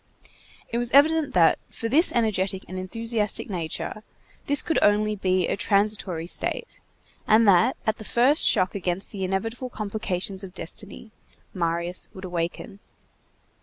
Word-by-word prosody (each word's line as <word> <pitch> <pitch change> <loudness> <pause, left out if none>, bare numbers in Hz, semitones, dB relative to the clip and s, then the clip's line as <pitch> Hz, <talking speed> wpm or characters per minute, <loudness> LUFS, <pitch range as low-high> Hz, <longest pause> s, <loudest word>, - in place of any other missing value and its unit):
It 235 - -1
was 240 -1 +3
evident 305 0 +4
that, 170 -2 +5
for 230 - -5
this 310 +9 +4
energetic 195 -5 0
and 185 - -8
enthusiastic 215 +3 -2
nature, 170 +4 -4 0.5
this 285 0 +2
could 325 - +1
only 210 +1 +3
be 185 -2 +1
a - - 0
transitory 200 -5 0
state, 175 - -3 0.5
and 220 +1 +5
that, 200 +6 +4
at 220 0 0
the - - -8
first 250 +7 +3
shock 185 -4 +3
against 185 0 -3
the 195 -3 -5
inevitable 225 +7 -3
complications 200 -3 -4
of 190 -1 -10
destiny, 205 +5 -7 0.4
Marius 170 0 -2
would 190 0 -8
awaken. 175 +2 -4
200 Hz, 140 wpm, -25 LUFS, 185-225 Hz, 0.5 s, that